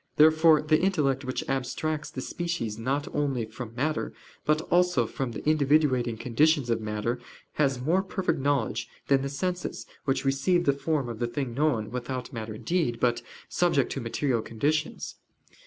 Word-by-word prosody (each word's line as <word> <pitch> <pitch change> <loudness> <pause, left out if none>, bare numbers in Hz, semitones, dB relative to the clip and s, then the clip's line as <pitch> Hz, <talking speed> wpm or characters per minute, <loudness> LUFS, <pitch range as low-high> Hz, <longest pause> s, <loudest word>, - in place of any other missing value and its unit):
Therefore 155 0 +6
the 155 +1 +3
intellect 145 -8 +1
which 130 - -3
abstracts 145 +4 -2
the 130 - -6
species 165 -11 -3
not 135 +5 -1
only 135 -6 0
from 115 +1 -8
matter, 150 +5 -1 0.3
but 155 +1 +3
also 175 -8 +4
from 130 +2 -3
the 110 - -6
individuating 140 -6 +2
conditions 140 +1 +2
of 115 -1 +1
matter, 105 +3 -2 0.4
has 135 -3 +2
more 165 +9 +2
perfect 190 -3 -1
knowledge 140 0 0 0.2
than 135 -1 +4
the 140 - -2
senses, 180 +6 -3 0.2
which 135 0 0
receive 140 +6 +2
the 140 - +4
form 140 -1 -1
of 115 -2 -6
the 120 - 0
thing 130 0 -3
known, 125 -6 +1
without 125 +1 -4
matter 110 -2 -5
indeed, 120 0 -1
but 120 -1 +2 0.3
subject 170 -7 +2
to 135 - -3
material 120 +1 0
conditions. 150 +9 -2
135 Hz, 160 wpm, -27 LUFS, 120-155 Hz, 0.4 s, Therefore